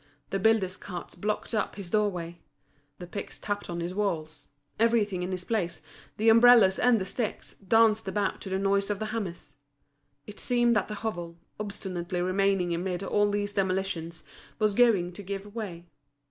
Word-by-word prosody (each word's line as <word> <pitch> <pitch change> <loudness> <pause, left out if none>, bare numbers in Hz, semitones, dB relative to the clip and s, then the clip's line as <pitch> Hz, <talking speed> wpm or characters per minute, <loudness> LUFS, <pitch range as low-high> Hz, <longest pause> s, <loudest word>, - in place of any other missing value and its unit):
The 195 - 0
builder's 195 -3 +2
carts 180 -3 -7
blocked 210 +6 -3
up 215 - -1
his 190 -4 -7
doorway; 180 -5 -1 0.6
the 180 - -8
picks 200 +3 -6
tapped 205 -2 -4
on 170 0 -3
his 175 +2 -3
walls; 160 -6 -3 0.3
everything 215 -5 +2
in 180 - -3
his 185 -1 -2
place, 180 -6 -1 0.4
the 220 - 0
umbrellas 230 -4 +7
and 245 -3 +4
the 190 - -3
sticks, 215 +3 -3
danced 220 +1 +3
about 200 +1 -1
to 195 - -6
the 190 - 0
noise 200 +1 +1
of 205 - 0
the 215 +1 -4
hammers. 175 -9 -5 0.7
It 210 - -11
seemed 240 -1 +3
that 210 - +1
the 210 - -5
hovel, 175 -6 -4 0.2
obstinately 185 -3 -4
remaining 185 -1 +1
amid 180 +2 -2
all 205 +1 +2
these 205 0 -1
demolitions, 185 -4 -2 0.3
was 215 -2 +2
going 200 -6 +3
to 205 - -8
give 200 +1 -6
way. 185 -7 -6
195 Hz, 170 wpm, -28 LUFS, 180-215 Hz, 0.7 s, umbrellas